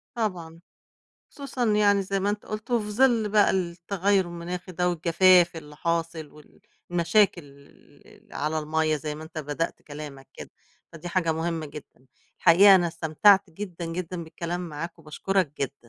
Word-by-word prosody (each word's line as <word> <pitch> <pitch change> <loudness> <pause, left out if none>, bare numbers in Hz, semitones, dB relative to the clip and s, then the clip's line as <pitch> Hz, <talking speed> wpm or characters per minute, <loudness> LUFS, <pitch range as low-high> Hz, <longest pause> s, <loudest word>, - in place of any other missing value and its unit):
طبعًا، 175 -7 -4 0.7
خصوصًا 275 -4 -4
يعني 210 -2 +3
زي 195 0 -2
ما 200 - +1
أنتم 210 0 -5
قُلتوا، 215 +3 -2
وفي 210 -1 -5
ظل 230 -2 +3
بقى 210 0 +4
التغيُّر 185 +2 0
المناخي 175 +2 -7
ده، 180 +1 0
والجفاف 175 +1 +4
اللي 150 -2 -10
حاصل 165 -1 -2
وال 150 0 -19 0.3
المشاكل 175 +1 +2
الل 140 0 -20
اللي - - -18
على 155 +2 -1
المَيَّة، 155 0 0
زي 150 0 -5
ما 155 - -9
أنت 160 0 -9
بدأت 150 +2 -4
كلامك 145 -3 -10
كده، - - -10 0.4
فدي 165 +1 -8
حاجة 170 -2 0
مهمّة 160 0 -3
جدًا. 145 -2 -13 0.3
الحقيقة 195 +4 +7
أنا 175 -2 +3
استمتعت 170 +4 +3
جدًا، 175 -1 -7
جدًا 170 +1 -5
بالكلام 170 +2 -5
معاك، 165 +3 -7
وباشكرك 165 +1 -1
جدًا. 140 0 -2
170 Hz, 155 wpm, -25 LUFS, 160-195 Hz, 0.7 s, الحقيقة